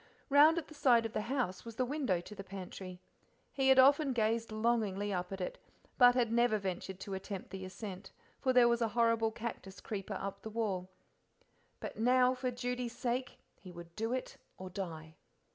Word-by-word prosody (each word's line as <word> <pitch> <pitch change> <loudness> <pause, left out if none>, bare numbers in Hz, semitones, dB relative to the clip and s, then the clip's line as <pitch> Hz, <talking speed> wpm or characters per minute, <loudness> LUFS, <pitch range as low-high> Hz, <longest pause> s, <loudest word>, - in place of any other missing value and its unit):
Round 295 +4 +7
at 330 - -3
the - - -12
side 245 -6 +4
of 225 - -4
the - - -1
house 230 -5 -2
was 230 -1 -9
the 255 - 0
window 255 - 0
to 210 - -11
the 195 -1 -8
pantry; 185 -1 -8 0.5
he 270 -1 +2
had 265 - +7
often 275 +1 +6
gazed 225 0 0
longingly 215 -3 0
up 180 0 -3
at 195 - -5
it, 180 - -4 0.4
but 245 -1 +8
had 240 -3 +2
never 235 -2 +3
ventured 190 -1 -4
to 195 - -5
attempt 190 -1 -6
the 190 -1 -6
ascent, 190 0 -8 0.3
for 260 - +1
there 250 -2 +6
was 235 0 +2
a 230 - +3
horrible 230 -1 +3
cactus 220 -4 -7
creeper 200 -2 -5
up 195 0 -5
the 220 - -6
wall. 205 -5 -2 0.9
But - - -7
now 250 +2 +4
for 255 0 -2
Judy's 245 -1 -4
sake 250 +1 -2 0.2
he 185 - -11
would 170 -1 -11
do 225 +2 -2
it 255 0 -3 0.2
or 185 0 -8
die. 160 -4 -6
225 Hz, 195 wpm, -33 LUFS, 190-250 Hz, 0.9 s, but